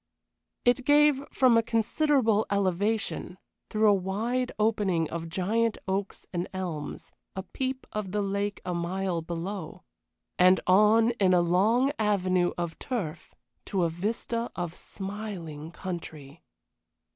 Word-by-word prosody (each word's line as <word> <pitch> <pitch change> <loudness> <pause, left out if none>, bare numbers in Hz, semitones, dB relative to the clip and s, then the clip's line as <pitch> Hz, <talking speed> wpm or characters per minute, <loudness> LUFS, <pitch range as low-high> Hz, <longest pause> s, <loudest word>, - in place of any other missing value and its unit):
It 245 +2 +3
gave, 290 0 +4
from 255 -3 +4
a 230 - +5
considerable 230 0 +2
elevation 200 0 -1 0.3
through 215 0 +3
a 205 - +7
wide 220 +7 -1
opening 205 -6 +1
of 165 0 -4
giant 210 +6 0
oaks 195 +1 -3
and 175 +1 -2
elms 175 -6 -5 0.2
a 190 - -4
peep 260 +6 -4
of 210 -3 -3
the 205 0 0
lake 200 +1 -2
a 180 - -2
mile 175 0 -1
below, 170 +1 -5 0.6
and 185 +1 +6
on 215 +5 +5
in 185 -2 +4
a 175 - +5
long 215 +10 +3
avenue 185 -4 +2
of 170 -2 -4
turf 200 -12 -4 0.3
to 190 -3 0
a 170 - +2
vista 225 +6 -2
of 175 -1 -4
smiling 190 -7 -7
country. 165 -5 -7
195 Hz, 130 wpm, -28 LUFS, 175-225 Hz, 0.6 s, a